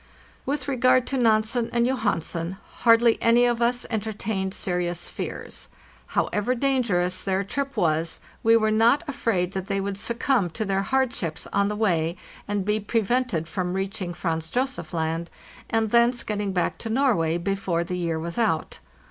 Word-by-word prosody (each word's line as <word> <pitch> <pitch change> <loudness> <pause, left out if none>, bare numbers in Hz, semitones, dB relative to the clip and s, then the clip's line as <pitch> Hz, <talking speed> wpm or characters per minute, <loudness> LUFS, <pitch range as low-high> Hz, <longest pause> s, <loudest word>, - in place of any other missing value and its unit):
With 280 -1 -1
regard 255 -1 +3
to 270 - -2
Nansen 225 +1 +2
and 235 0 +2
Johansen, 190 -8 -1 0.2
hardly 230 0 +4
any 235 +1 +5
of 240 -1 +1
us 245 +1 +1
enter 220 -1 -1
tained 195 -2 -2
serious 175 -2 -1
fears; - - -6 0.5
however 210 +5 +1
dangerous 230 -9 +1
their 195 0 0
trip 275 +6 -4
was, 160 0 +1 0.2
we 225 +1 +5
were 215 -1 +2
not 230 +8 +4
afraid 230 -10 0
that 190 -1 -4
they 195 0 0
would 195 0 -3
succumb 235 -3 0
to 190 +7 -3
their 195 -1 0
hardships 235 -8 -1
on 200 0 +3
the 210 - -2
way, 175 -5 +1 0.3
and 205 -2 -1
be 210 +1 +1
prevented 225 -4 0
from 180 +1 -2
reaching 190 -2 -3
Franz 160 -2 -2
Josef 260 +5 -2
Land, 165 0 -2 0.4
and 225 -1 +1
thence 235 0 +4
getting 205 -2 -2
back 180 -2 -1
to 225 - -4
Norway 220 - +2
before 175 -1 -1
the 180 +1 -4
year 170 -2 -1
was 170 +5 -4
out. 205 -9 0
205 Hz, 165 wpm, -25 LUFS, 180-235 Hz, 0.5 s, any